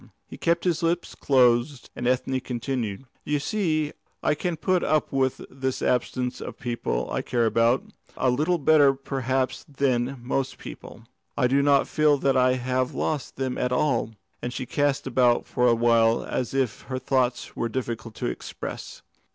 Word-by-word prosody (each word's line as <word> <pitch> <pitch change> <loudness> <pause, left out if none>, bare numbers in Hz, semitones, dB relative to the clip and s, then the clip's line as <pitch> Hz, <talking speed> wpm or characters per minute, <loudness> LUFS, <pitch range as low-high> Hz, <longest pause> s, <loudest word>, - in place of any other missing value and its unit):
He - - -10
kept 170 0 +1
his 175 -2 +1
lips 170 +1 0
closed, 125 0 +2
and 120 - -2
Ethne 130 +1 +1
continued: 125 -3 -3 0.2
"You 150 - 0
see 155 -2 -1 0.3
I - - +3
can 165 +2 -2
put 185 +2 +1
up 155 -1 +1
with 130 -1 0
the 130 0 -2
absence 125 0 -1
of - - -7
the - - -19
people 120 - -2
I - - -1
care 120 -2 0
about, 115 +3 +3 0.3
a 130 - +2
little 155 +8 +1
better 145 -3 +5
perhaps 130 -1 -2
than 135 -2 0
most 130 +2 -2
people. - - -10 0.3
I - - +3
do 135 +3 +3
not 140 -1 +4
feel 150 -1 +3
that 135 0 +1
I 130 0 +4
have 130 0 -1
lost 150 -4 -2
them 130 -1 -2
at 125 - 0
all," 125 -4 +1 0.3
and 125 - -3
she 130 - -4
cast 145 +2 0
about 125 -2 +3
for 125 - +1
a 120 - +5
while 115 -1 +3
as 130 +1 -3
if 130 -5 0
her 130 - -2
thought 130 -1 0
was 115 - -1
difficult 115 -2 -4
to - - -4
express. - - -6
130 Hz, 175 wpm, -25 LUFS, 125-145 Hz, 0.3 s, better